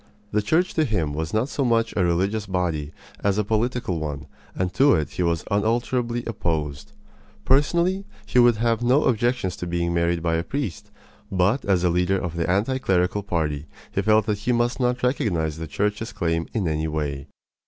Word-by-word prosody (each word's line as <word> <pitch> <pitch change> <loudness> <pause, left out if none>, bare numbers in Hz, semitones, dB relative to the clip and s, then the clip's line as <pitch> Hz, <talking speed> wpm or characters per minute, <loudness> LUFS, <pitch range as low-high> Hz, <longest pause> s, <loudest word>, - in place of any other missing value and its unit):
The 105 - +2
Church 160 - +1
to 160 - +2
him 85 - -1
was 80 +1 -3
not 110 +4 +1
so 140 - -2
much 115 -2 +2
a 95 - +2
religious 95 +5 0
body 85 -6 -1 0.3
as 100 0 +2
a 105 - +2
political 110 -3 -1
one, 75 -2 -4 0.3
and 90 -1 -1
to 140 +5 +5
it 75 -3 -1
he - - -4
was 85 -2 +1
unalterably 120 +3 0
opposed. 75 -9 -3 0.5
Personally, 170 +8 +2 0.2
he 125 - +2
would 120 -1 +6
have 115 +1 +1
no 125 +5 +3
objections 120 -5 +1
to 90 - -5
being 85 0 -1
married 85 0 +1
by 85 -1 +1
a 80 - -1
priest; 135 - -4 0.4
but 95 +7 +2
as 95 -3 +2
a 90 - +3
leader 90 +3 +2
of 90 -2 -4
the 85 0 -1
anti 110 +8 +1
clerical 95 -2 +1
party 80 -6 -2 0.2
he 100 - 0
felt 110 +1 +3
that 105 -2 -1
he 110 +4 0
must 120 +1 +1
not 125 -1 0
recognize 85 - 0
the 80 - -5
Church's 105 +8 -2
claim 80 -1 -1
in 105 -7 -1
any 80 0 -1
way. 75 -3 -3
100 Hz, 190 wpm, -24 LUFS, 85-120 Hz, 0.5 s, would